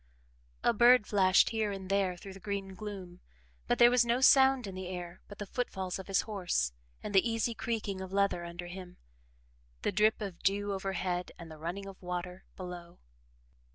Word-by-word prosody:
A - - +4
bird 240 0 +6
flashed 190 -2 +4
here 220 -2 0
and 195 -1 -6
there 195 -2 +1
through 195 +2 -10
the 195 - -11
green 195 -1 -4
gloom, 190 -3 -8 0.5
but - - +2
there 240 0 +7
was 250 -1 +5
no 235 +1 +1
sound 265 -1 +6
in 195 - -6
the 185 0 -6
air 175 -1 -7
but 205 - -11
the 205 - -5
footfalls 190 -5 -3
of 190 - -8
his 195 -1 +2
horse 180 - -1 0.3
and - - -5
the 195 +4 +4
easy 225 +1 0
creaking 220 -4 -3
of 190 0 -7
leather 200 -3 +1
under 170 +1 -7
him, 180 0 -9 0.9
the - - +1
drip 210 +3 +3
of 195 -5 -6
dew 200 +1 +1
overhead 190 -2 -2
and 165 -2 -10
the 155 - -10
running 175 +5 -4
of 195 -1 -11
water 180 0 -5
below. 180 -2 -8
195 Hz, 190 wpm, -31 LUFS, 180-210 Hz, 0.9 s, there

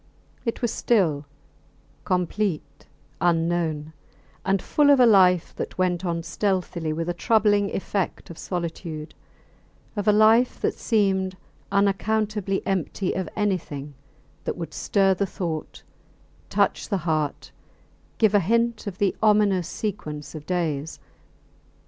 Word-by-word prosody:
It 230 +1 -3
was 235 - +1
still, 165 -11 +1 0.8
complete, 185 -1 -2 0.3
unknown, 165 -3 0 0.5
and 195 +1 +2
full 290 +9 +2
of 280 -2 +6
a 250 - +7
life 185 -6 +5
that - - -5
went 180 -1 0
on 170 -2 -2
stealthily 180 -5 -1
with 165 +2 -3
a 175 - 0
troubling 205 +1 +2
effect 195 -2 -3
of 165 - -10
solitude; 170 -3 -5 0.8
of 205 0 -3
a - - +7
life 220 +4 +4
that - - 0
seemed 190 -4 0 0.3
unaccountably 205 0 0
empty 190 0 -1
of 185 -3 -3
anything 155 -9 -2 0.5
that - - -2
would 170 -2 -6
stir 195 -2 +2
the 195 +2 -1
thought, 170 -5 -5 0.7
touch - - +1
the 200 - +1
heart, 155 -3 -1 0.7
give 220 -3 +3
a 205 - +6
hint 230 +4 0
of 190 -2 -5
the 200 -2 +1
ominous 205 -5 +3
sequence 150 -9 -5
of 155 -2 -9
days. 160 -4 -2
190 Hz, 125 wpm, -24 LUFS, 165-210 Hz, 0.8 s, a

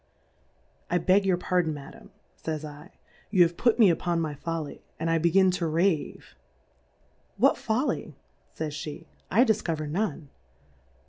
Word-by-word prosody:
I 175 - +2
beg 190 +3 +3
your 185 -2 +3
Pardon, 175 -3 0
Madam, 140 -1 -12 0.3
fays 155 - -4 0.4
/, - - -32
you 185 -3 +6
have 170 0 0
put 235 +3 +2
me 215 -7 +6
upon 170 0 -1
my 155 -2 -2
Folly, 160 +1 -5 0.2
and 165 +1 0
I 165 - +2
begin 185 +3 +4
to 175 -2 -1
Rave: 165 - -1 1.0
What 265 +7 +4
Folly, 245 - -2 0.3
fays 155 -1 -5
fie, 155 +1 -7 0.2
I 235 +7 +5
difcover 170 - 0
none 170 -2 -2
170 Hz, 140 wpm, -27 LUFS, 155-195 Hz, 1.0 s, you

